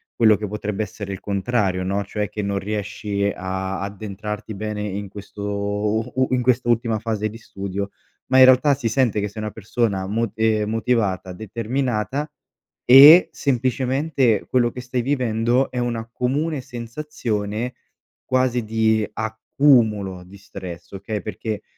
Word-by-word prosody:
quello 110 -2 +5
che 105 +1 -4
potrebbe 105 0 -3
essere 100 -1 -5
il 95 - -6
contrario, 100 -2 -1
no, 100 +2 -1
cioè 105 +1 -3
che 105 - -4
non 100 -1 -1
riesci 100 0 -2
a 95 +1 -3
addentrarti 105 +1 -6
bene 105 +1 -4
in 100 -1 -4
questo 100 +1 -9
u 105 +2 -1
u 130 0 +2
in 125 -1 +2
quest'ultima 120 -2 +1
fase 110 -1 -2
di 110 - -10
studio, 100 -3 -5 0.4
ma 130 - +5
in 130 - +10
realtà 130 +3 +5
si 130 -3 -3
sente 115 -2 +1
che 105 - -1
sei 105 +2 -7
una 105 0 -4
persona 105 -2 -1
mot 110 +1 -1
ehm, 110 -1 +1
motivata, 110 -5 0
determinata 120 - -2 0.5
e 145 +8 +10
semplicemente 130 -2 +1
quello 120 -2 +2
che 125 - -8
stai 125 0 -2
vivendo 125 -1 +1
è 125 - -3
una 115 -2 -2
comune 140 +5 -1
sensazione 120 -3 -4 0.5
quasi 130 -2 +1
di 110 0 +2
accumulo 110 -4 +1
di 95 +3 -14
stress, 95 -3 -9
okay, 100 +2 -4
perché 110 0 -5
110 Hz, 145 wpm, -22 LUFS, 100-125 Hz, 0.5 s, in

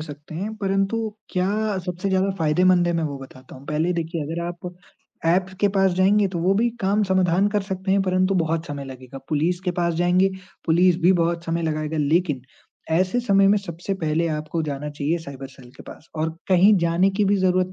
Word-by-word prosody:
सकते 150 0 -9
हैं, 205 +6 -4
परंतु 195 +1 0 0.3
क्या 205 +3 0
सबसे 180 +2 -3
ज़्यादा 190 +1 +1
फ़ायदेमंद 175 +3 +3
है 175 - +1
मैं 165 -1 0
वो 140 -3 -4
बताता 130 -1 -13
हूँ। 130 - -14
पहले 155 +4 0
देखिए, 165 -1 -3
अगर 165 +3 -4
आप 175 +1 -6 0.6
ऐप्स 185 +3 +1
के 205 - +4
पास 195 -1 +2
जाएँगे 195 +3 +3
तो 180 -2 -4
वो 180 +4 +2
भी 230 +4 +2
काम 200 +2 +2
समाधान 190 0 +2
कर 205 -1 0
सकते 190 0 -4
हैं 200 - +3
परंतु 185 +1 +1
बहुत 165 -1 0
समय 145 -3 -6
लगेगा, 130 0 -10
पुलिस 165 +4 0
के 185 -1 -1
पास 170 -1 +1
जाएँगे, 180 +3 +3 0.4
पुलिस 175 +1 +4
भी 180 +2 +5
बहुत 170 0 0
समय 170 0 -2
लगाएगा 155 0 -2
लेकिन 150 -1 +1 0.5
ऐसे 185 +8 +1
समय 195 -4 +3
में 210 - +4
सबसे 185 0 -5
पहले 165 -1 -1
आपको 155 +1 -3
जाना 145 -1 -4
चाहिए 150 +3 -1
साइबर 140 -4 -8
सेल 130 -2 -16
के - - -11
पास 160 - -13
और 160 +1 -1 0.2
कहीं 190 +3 +6
जाने 170 +3 +2
की 210 - +4
भी 200 +1 +3
ज़रूरत 185 0 +1
175 Hz, 205 wpm, -23 LUFS, 160-190 Hz, 0.6 s, कहीं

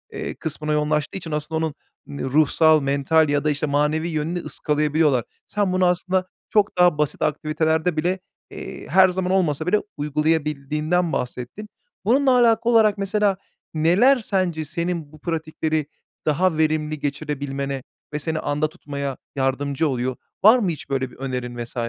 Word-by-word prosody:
ııı, - - -4
kısmına 155 0 -3
yoğunlaştığı 150 +2 0
için 165 -4 -7
aslında 150 +1 -2
onun 155 -2 -4 0.5
ruhsal, 155 +3 +4
mental 140 +3 +2
ya 145 -1 +1
da, 150 - +2
işte, 145 +1 0
manevi 150 +3 +1
yönünü 160 +3 -2
ıskalayabiliyorlar. 150 -5 +1 0.2
Sen 200 -3 0
bunu 185 0 +3
aslında 185 +1 +1 0.2
çok 205 -3 +2
daha 175 -4 +5
basit 150 -2 -1
aktivitelerde 160 +2 0
bile, 180 +4 0 0.3
eee, - - -8
her 190 0 +6
zaman 180 0 -1
olmasa 160 -5 +1
bile 210 +3 +3 0.2
uygulayabildiğinden 150 +2 0
bahsettin. 125 - -4 0.4
Bununla 265 +5 +4
alakalı 235 0 +3
olarak 215 -2 +5
mesela 200 0 +1 0.4
neler 185 - +4
sence 185 -7 -1
senin 170 -1 -3
bu 155 - -14
pratikleri 155 -2 -2 0.4
daha 160 +2 +2
verimli 155 -1 0
geçirebilmene 140 -2 -3 0.3
ve 150 - -1
seni 160 +1 -2
anda 150 +1 -1
tutmaya 140 -5 -5 0.2
yardımcı 140 +3 0
oluyor? 130 -1 -1 0.3
Var 220 +5 +8
mı 195 - 0
hiç 155 -4 -6
böyle 130 -2 -1
bir - - -15
önerin 125 -2 -4
vs. 120 - -13
155 Hz, 150 wpm, -22 LUFS, 145-180 Hz, 0.5 s, Var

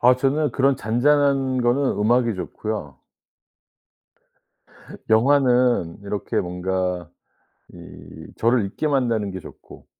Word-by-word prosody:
아 125 +1 +5
저는 140 +3 0
그런 135 +2 +2
잔잔한 135 +3 +1
거는 125 +3 +1
음악이 115 +1 +2
좋고요. 90 -6 -6 2.1
영화는 125 -6 +3
이렇게 100 -1 -3
뭔가 90 -1 -3 0.6
이 80 0 -13
저를 115 -2 +2
잊게 155 +10 -3
만드는 115 -8 0
게 95 - -6
좋고. - - -14
120 Hz, 210 characters per minute, -22 LUFS, 95-135 Hz, 2.1 s, 아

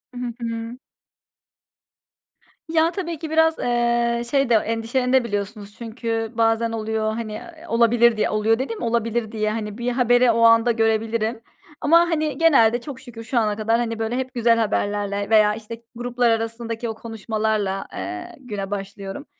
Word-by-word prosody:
Hı 245 - -5 0.2
hı. 230 0 -5 1.9
Ya 325 +1 +2
tabii 340 -4 -4
ki 320 - -5
biraz, 320 0 +3
eee, 235 -1 +1
şey 275 -2 +2
de, 235 - +5
endişelenebiliyorsunuz 225 -2 -1
da. - - -24
Çünkü 225 -1 -3
bazen 225 0 +2
oluyor 220 -1 -2
hani, 220 -1 -5
eee, 325 +8 -10
olabilir 235 -2 +4
diye - - +1
oluyor 220 +2 +1
dediğim 255 -4 -4
olabilir 230 -1 -1
diye, 215 -1 -1
hani, 210 -1 -4
bir 240 +1 -1
haberi 245 0 +4
o 230 0 +1
anda 230 +1 +6
görebilirim 225 0 0 0.4
ama 325 +3 +5
hani, 310 -4 0
genelde 245 -8 +4
çok 265 0 -8
şükür 240 -4 -10
şu 235 +2 0
ana 210 -2 0
kadar 220 +2 +1
hani 230 -2 -2
böyle 225 +2 -1
hep 260 -1 -4
güzel 235 -1 +3
haberlerle 205 -2 -1
veya 215 -1 +5
işte, 225 +1 -9
gruplar 245 0 0
arasındaki 230 +1 -2
o 220 - -4
konuşmalarla, 215 -3 -2
eee, 355 0 -6
güne 205 -6 -6
başlıyorum. 195 +5 -6
230 Hz, 155 wpm, -22 LUFS, 220-245 Hz, 1.9 s, anda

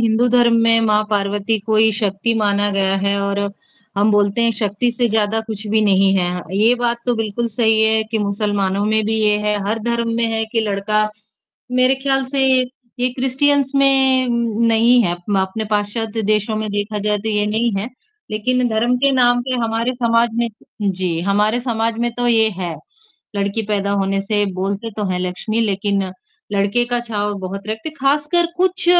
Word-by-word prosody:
हिंदू 230 +1 +2
धर्म 240 -1 +4
में 230 0 +4
माँ 215 -1 +2
पार्वती 205 +1 0
को 215 +2 -1
ही 220 +1 +5
शक्ति 205 +1 -1
माना 205 -1 +1
गया 195 -1 +1
है 200 +1 0
और 200 0 -1 0.6
हम 205 +2 +3
बोलते 205 +2 +2
हैं 230 - +3
शक्ति 210 +3 0
से 240 0 0
ज़्यादा 220 0 +1
कुछ 215 -1 -6
भी 220 +1 +2
नहीं 195 -1 +3
है, 180 -1 -1 0.2
ये 225 +4 +4
बात 240 -1 0
तो 245 - +2
बिल्कुल 225 +1 -2
सही 220 -1 +3
है 220 0 +3
कि 225 - 0
मुसलमानों 200 -1 -1
में 215 +1 +1
भी 220 +1 -1
ये 210 0 +3
है, 210 0 0
हर 220 +2 -1
धर्म 235 -1 0
में 235 - +1
है 225 0 0
कि 230 - +1
लड़का 215 0 0 0.6
मेरे 255 +1 +3
ख्याल 270 -1 +1
से 275 - +2 0.6
ये 250 - +2
क्रिश्चियंस 270 +1 +2
में 265 -2 +3 0.4
नहीं 235 +2 +4
है 175 -4 0
अप 185 +3 -3
अपने 190 +4 -3
पश्चात्य 215 +2 -1
देशों 215 +1 0
में 215 0 -3
देखा 205 +1 -3
जाए 210 0 0
तो 215 +2 -5
ये 210 -1 0
नहीं 225 +2 0
है। 205 +4 -4 0.4
लेक़िन 250 +4 0
धर्म 235 +3 +1
के 280 +2 +3
नाम 245 -2 +3
पे 255 +1 -3
हमारे 230 +3 -1
समाज 235 -1 +2
में 235 0 0 0.3
जी, 185 -4 -1
हमारे 210 +5 +1
समाज 230 -2 -1
में 240 0 0
तो 245 0 -1
ये 225 -2 +4
है, 175 -3 -3 0.6
लड़की 200 +2 -1
पैदा 200 -1 0
होने 195 0 0
से 205 +1 0
बोलते 200 +4 -3
तो 210 - -2
हैं 180 - -1
लक्ष्मी 185 +5 -2
लेक़िन 200 -2 0 0.5
लड़के 200 +4 +1
का 245 0 -1
छाव 210 -3 -3
बहुत 195 +2 -6
रखते 220 +8 -4
ख़ासकर 295 +5 +2
कुछ 370 +1 +1
220 Hz, 185 wpm, -18 LUFS, 200-235 Hz, 0.6 s, ही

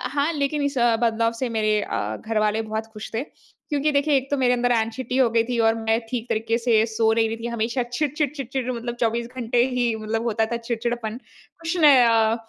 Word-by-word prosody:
हाँ 290 +3 +2
लेकिन 290 0 -1
इस 280 0 -1 0.3
बदलाव 230 0 +2
से 255 - -1
मेरे 215 -2 +1
अ, 110 - -3
घरवाले 215 -1 +1
बहुत 220 0 -4
खुश 215 0 -8
थे। 225 +3 -1 0.5
क्योंकि 295 0 +1
देखिए 285 +1 +2
एक 270 +1 -4
तो 285 - +1
मेरे 250 -2 +3
अंदर 245 0 +1
ऐंग्ज़ाइटी 240 +3 -1
हो 260 -3 +4
गयी 230 0 +2
थी 245 - -1
और 225 - +1
मैं 225 0 +1
ठीक 235 -2 -3
तरीके 225 +1 0
से 230 -2 +3
सो 220 0 +2
नहीं 225 0 +2
रही 225 - -4
थी। 230 +1 -5
हमेशा 235 +3 -1
चिड़-चिड़ 290 +4 -1
चिड़-चिड़ 265 -2 -4
मतलब 240 0 -4
24 235 +1 0
घंटे 240 -1 +1
ही 240 -2 +1
मतलब 225 +1 -1
होता 220 +1 +1
था - - 0
चिड़चिड़ापन। 235 -1 -3 0.4
खुश 330 +2 -2
नह 285 -7 +7
अ, 225 -1 +3
235 Hz, 210 wpm, -23 LUFS, 225-260 Hz, 0.5 s, नह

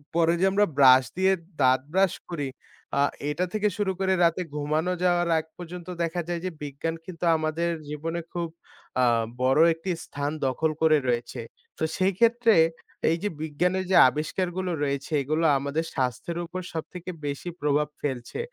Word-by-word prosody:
পরে 165 0 +4
যে 190 - +5
আমরা 205 +1 +4
ব্রাশ 130 -1 +8
দিয়ে 190 +1 +4 0.3
দাঁত 130 0 +4
ব্রাশ 190 -1 +3 0.2
করি 145 -5 -3 0.5
আ - - +5 0.3
এটা 180 +5 0
থেকে 210 0 +1
শুরু 205 -2 +1
করে 190 0 +2
রাতে 170 +2 +3
ঘুমানো 155 +4 0
যাওয়ার 175 -1 +2
আগ 160 - -1
পর্যন্ত 175 0 -8 0.2
দেখা 170 +1 -1
যায় 175 -1 -2
যে 185 - -2
বিজ্ঞান 145 +3 -3
কিন্তু 175 -1 -5
আমাদের 155 +2 -1 0.2
জীবনে 165 +3 -3
খুব 170 -1 -2 0.5
আ - - +4 0.4
বড় 130 +4 +3
একটি 165 +3 -4
স্থান 145 +1 -3 0.2
দখল 155 +5 0
করে 155 -1 +5
রয়েছে। 120 -1 -1 0.4
তো - - -3
সেই 190 +1 +2
ক্ষেত্রে 235 0 +4 0.6
এই 165 - +2
যে 205 - +1
বিজ্ঞানের 180 +5 0
যে - - +4
আবিষ্কারগুলো 175 +5 -2
রয়েছে 140 +2 -2
এগুলো 155 +4 0
আমাদের 140 +4 -2
স্বাস্থ্যের 130 +7 -2
উপর 185 +2 -5
সবথেকে 180 +3 -6
বেশি 145 +5 -4
প্রভাব 150 0 +2
ফেলছে। 130 - -4
165 Hz, 160 wpm, -26 LUFS, 145-180 Hz, 0.6 s, ব্রাশ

